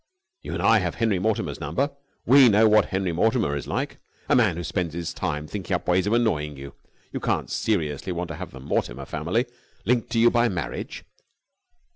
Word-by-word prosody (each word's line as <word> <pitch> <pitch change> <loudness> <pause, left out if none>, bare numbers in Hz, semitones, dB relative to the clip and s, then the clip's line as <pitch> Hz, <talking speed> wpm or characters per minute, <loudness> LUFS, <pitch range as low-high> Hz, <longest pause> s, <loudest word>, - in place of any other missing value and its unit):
You - - -6
and - - -3
I 115 -1 +5
have 90 -3 -2
Henry 110 -5 +1
Mortimer's 110 +2 -1
number. 135 - -1 0.3
We 130 0 +7
know 110 +1 +5
what 110 0 +5
Henry 95 -2 -1
Mortimer 90 - +1
is 70 - -5
like! - - -3 0.3
A - - +5
man 105 -9 +3
who 85 - -4
spends 85 0 -2
his 85 -1 -4
time 75 +1 -3
thinking 95 +2 -3
up 90 - -5
ways 90 +1 +2
of 105 - +1
annoying 75 - 0
you. 70 +1 -9 0.4
You - - -2
can't - - -1
seriously 80 -5 -1
want 90 0 -3
to 80 - -5
have - - -6
the 65 - -11
Mortimer 70 - -2
family - - -1 0.4
linked 120 +2 +1
to - - +1
you 120 +1 +6
by 120 0 +3
marriage." 85 -5 -5
95 Hz, 200 wpm, -25 LUFS, 80-115 Hz, 0.4 s, We